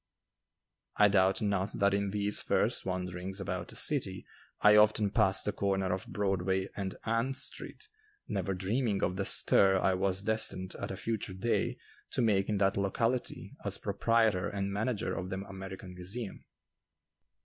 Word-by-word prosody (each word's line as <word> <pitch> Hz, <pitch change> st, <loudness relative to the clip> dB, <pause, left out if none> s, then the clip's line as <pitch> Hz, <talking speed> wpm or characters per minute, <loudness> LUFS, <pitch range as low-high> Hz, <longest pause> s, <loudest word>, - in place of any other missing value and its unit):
I 105 Hz, 0 st, +6 dB
doubt 95 Hz, 0 st, +3 dB
not 100 Hz, -1 st, -1 dB
that 100 Hz, 0 st, +3 dB
in 100 Hz, 0 st, 0 dB
these 105 Hz, +1 st, +1 dB
first -, -, 0 dB
wanderings 90 Hz, +1 st, -4 dB
about 95 Hz, -, -4 dB
the -, -, -12 dB
city -, -, +1 dB, 0.3 s
I 105 Hz, 0 st, +6 dB
often 105 Hz, -1 st, +4 dB
passed 100 Hz, -4 st, +2 dB
the 105 Hz, -, +1 dB
corner 95 Hz, -2 st, 0 dB
of 95 Hz, 0 st, -4 dB
Broadway 95 Hz, -1 st, -1 dB
and 95 Hz, -2 st, -4 dB
Ann 115 Hz, +4 st, 0 dB
Street 140 Hz, -, -4 dB, 0.4 s
never 95 Hz, -, -2 dB
dreaming 100 Hz, +2 st, -1 dB
of 90 Hz, -, 0 dB
the 95 Hz, +1 st, -2 dB
stir 95 Hz, 0 st, +4 dB
I 95 Hz, -, +2 dB
was 95 Hz, +1 st, 0 dB
destined 105 Hz, -4 st, 0 dB
at -, -, -4 dB
a 95 Hz, -, -5 dB
future 110 Hz, -3 st, -3 dB
day 115 Hz, +5 st, 0 dB, 0.4 s
to -, -, +1 dB
make 100 Hz, -3 st, +2 dB
in 105 Hz, -, +1 dB
that 100 Hz, 0 st, +2 dB
locality 115 Hz, +5 st, -1 dB
as -, -, 0 dB
proprietor 110 Hz, -5 st, +1 dB
and 100 Hz, -1 st, -3 dB
manager 110 Hz, +2 st, -1 dB
of 90 Hz, +2 st, -4 dB
the 95 Hz, -, -3 dB
American 95 Hz, -1 st, -8 dB
Museum. 95 Hz, +5 st, -6 dB
100 Hz, 160 wpm, -31 LUFS, 95-105 Hz, 0.4 s, I